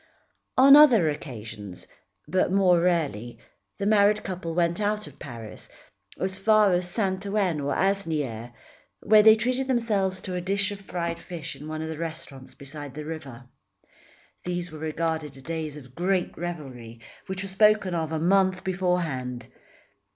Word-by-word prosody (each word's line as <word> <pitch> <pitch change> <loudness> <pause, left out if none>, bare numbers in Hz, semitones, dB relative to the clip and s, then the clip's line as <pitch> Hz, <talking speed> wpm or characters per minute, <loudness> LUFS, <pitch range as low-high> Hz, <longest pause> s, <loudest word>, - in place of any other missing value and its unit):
On 275 +2 +9
other 240 - +7
occasions, 110 - -8 0.4
but 185 +3 +1
more 185 -3 +4
rarely, 145 - -1 0.4
the 200 - -3
married 210 0 +4
couple 175 -3 -5
went 170 +2 +1
out 210 +1 -1
of 150 -2 -14
Paris, 115 -5 -9 0.5
as 190 0 -1
far 210 0 +4
as 180 0 0
Saint 190 -1 -1
Ouen 195 -6 0
or 140 0 -1
Asnières, 155 - -1 0.5
where 215 0 +6
they 220 +1 +8
treated 255 +4 -1
themselves 210 -7 0
to 185 - -5
a 180 - -2
dish 200 +3 0
of 200 -1 -7
fried 170 -3 -4
fish 165 -3 -7
in 150 - -10
one 155 0 -4
of - - -4
the 160 -1 -6
restaurants 160 -5 -7
beside 140 0 -9
the 150 0 -6
river. 140 -6 -8 1.0
These 175 -1 -3
were 155 - -9
regarded 160 -2 -3
as 135 - -14
days 160 -2 -4
of 130 -3 -13
great 180 +3 -1
revelry 130 -10 -7 0.3
which 190 0 -4
were - - -5
spoken 210 -1 +3
of 160 -2 -2
a 160 - -1
month 185 +2 +2
beforehand. 170 -10 -2
175 Hz, 160 wpm, -26 LUFS, 150-195 Hz, 1.0 s, On